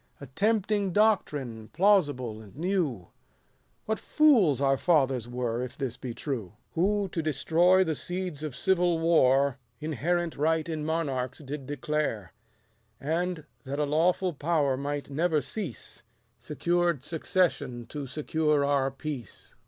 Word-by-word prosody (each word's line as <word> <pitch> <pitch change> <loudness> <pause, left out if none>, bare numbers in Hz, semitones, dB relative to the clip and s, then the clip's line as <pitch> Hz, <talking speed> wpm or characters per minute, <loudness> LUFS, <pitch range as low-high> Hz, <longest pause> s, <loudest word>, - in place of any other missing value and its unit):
110 140 - -9
A - - -31
tempting 205 0 +1
doctrine, 145 - +1
plausible 145 - +2
and 105 -1 -15
new; 155 - -1 0.8
What 220 0 -1
fools 235 - +4
our 135 -1 +3
fathers 135 -7 +2
were, 120 -1 -2
if 125 -1 -6
this 130 -4 -3
be 125 -2 -6
true! 120 - -4 0.2
Who, 200 +4 +1
to 165 - -2
destroy 165 +5 +3
the 160 -3 -1
seeds 175 -1 -4
of 150 -4 -5
civil 180 -3 +2
war, 140 -5 +3 0.2
Inherent 160 +3 -1
right 160 +2 +1
in 160 -2 -3
monarchs 140 -6 -2
did 140 -2 -7
declare: 145 - -2 0.7
And, 165 +2 -2 0.2
that 140 0 -4
a 150 - +1
lawful 175 +5 +1
power 145 -2 +1
might 145 +1 -4
never 160 +2 +1
cease, 145 - -6 0.4
Secured 170 +3 0
succession 150 -6 -1
to 145 -2 -5
secure 150 +1 +1
our 140 -1 +2
peace. 135 - -7
150 Hz, 135 wpm, -28 LUFS, 135-175 Hz, 0.8 s, fools